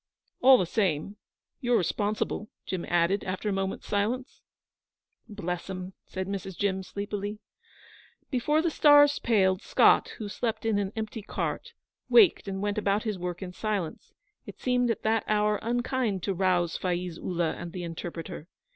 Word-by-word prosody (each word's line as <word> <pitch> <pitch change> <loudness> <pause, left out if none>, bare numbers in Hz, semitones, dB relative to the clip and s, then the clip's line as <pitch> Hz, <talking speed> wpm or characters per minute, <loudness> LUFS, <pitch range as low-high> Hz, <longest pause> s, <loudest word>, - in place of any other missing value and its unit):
'All 260 0 +8
the 185 - +1
same, 190 0 -1 0.4
you're 245 -3 +2
responsible,' 210 +3 -1 0.2
Jim 185 -2 -3
added, 175 +3 +2
after 185 +3 -3
a - - 0
moment's 195 0 -2
silence. 230 +6 -2 0.9
'Bless 180 -4 -4
'em,' 185 0 -6
said 190 0 -4
Mrs. 195 -2 -5
Jim, 190 -2 0
sleepily. 205 +2 -4 0.9
Before 300 +5 +2
the 340 - +1
stars 290 -1 +6
paled, 190 -4 +2
Scott, - - +4
who 215 - -5
slept 220 +2 -3
in 220 -2 +2
an 195 -1 -2
empty 220 0 -4
cart, 470 - -4 0.4
waked 405 - +6
and 195 0 -3
went 205 +1 0
about 205 0 +1
his 210 -5 -3
work 180 +1 -4
in 180 -1 -7
silence; 200 -5 -3 0.4
it - - -10
seemed 250 -1 +1
at 230 - -1
that 220 0 +2
hour 210 0 +2
unkind 240 -4 -1
to 195 - 0
rouse 180 -2 +1
Faiz 180 -2 -2
Ullah 170 -3 -1
and 170 - -7
the 180 0 -5
interpreter. 165 -1 -6
200 Hz, 155 wpm, -28 LUFS, 185-225 Hz, 0.9 s, All